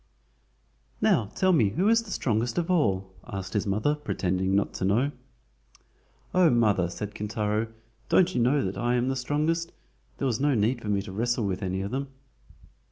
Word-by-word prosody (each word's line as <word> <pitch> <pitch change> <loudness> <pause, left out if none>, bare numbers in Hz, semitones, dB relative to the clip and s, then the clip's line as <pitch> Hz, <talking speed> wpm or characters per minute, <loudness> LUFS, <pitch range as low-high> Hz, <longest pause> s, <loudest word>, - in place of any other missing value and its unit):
"Now 110 - +3
tell 185 -1 +3
me 115 - +4
who 180 - 0
is 230 +1 +5
the 225 - -12
strongest 115 - -1
of 175 +1 0
all?" 95 - +1
asked 95 -1 -6
his 105 0 0
mother, 105 +9 +1
pretending 95 -10 -1
not 100 - +1
to - - -2
know. 120 +9 +2 1.2
"Oh, 180 -2 +5
mother," 105 - +2
said 105 +3 -6
Kintaro, 105 +1 -1 0.4
"don't 185 0 +4
you 120 - +1
know 135 +2 +2
that 95 - -4
I 120 +1 +1
am 125 +1 +1
the 135 - 0
strongest? 155 +6 -1 0.5
There - - -2
was 120 -4 0
no 145 -1 +2
need 115 +3 +1
for 105 - -5
me 100 -1 +1
to 100 - -8
wrestle 115 +3 0
with 95 -2 -2
any 95 0 -2
of 100 +2 -4
them." 135 +2 -2
115 Hz, 185 wpm, -27 LUFS, 100-145 Hz, 1.2 s, is